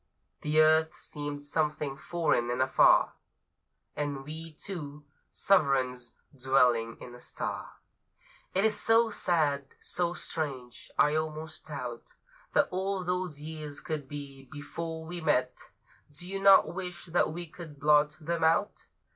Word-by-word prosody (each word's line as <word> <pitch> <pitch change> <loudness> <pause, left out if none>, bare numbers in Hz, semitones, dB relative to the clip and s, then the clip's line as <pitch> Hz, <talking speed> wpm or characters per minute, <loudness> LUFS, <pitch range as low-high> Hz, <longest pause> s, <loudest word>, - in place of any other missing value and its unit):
The 150 +1 +2
earth 155 0 +5
seemed 145 -1 -6
something 150 -2 -1
foreign 155 -5 0
and 120 +1 -1
afar, 130 0 +5 0.8
And 145 -2 -3
we 160 +2 -8
two, 150 -4 -7 0.2
sovereigns 130 -9 +1 0.2
dwelling 125 -3 +2
in 120 - -10
a 125 - -11
star! - - -5 0.8
It 195 +3 +4
is 215 -1 +2
so 225 0 +4
sad, 145 -8 0
so 175 -1 -2
strange, 135 -9 -4
I 150 - +4
almost 155 0 -4
doubt - - -7 0.4
That - - +4
all 190 +1 -1
those 180 -4 -2
years 155 -2 -7
could 150 -4 -4
be, 140 -2 -9
before 160 +2 -6
we 175 +1 -5
met. 125 -4 +2 0.6
Do 155 +5 -8
you 195 +1 -3
not 195 -4 +7
wish 180 -1 -5
that 170 -2 +1
we 175 +2 -5
could 160 -3 -11
blot 150 0 +4
them 165 +1 -2
out? 165 +6 +1
155 Hz, 135 wpm, -30 LUFS, 140-170 Hz, 0.8 s, not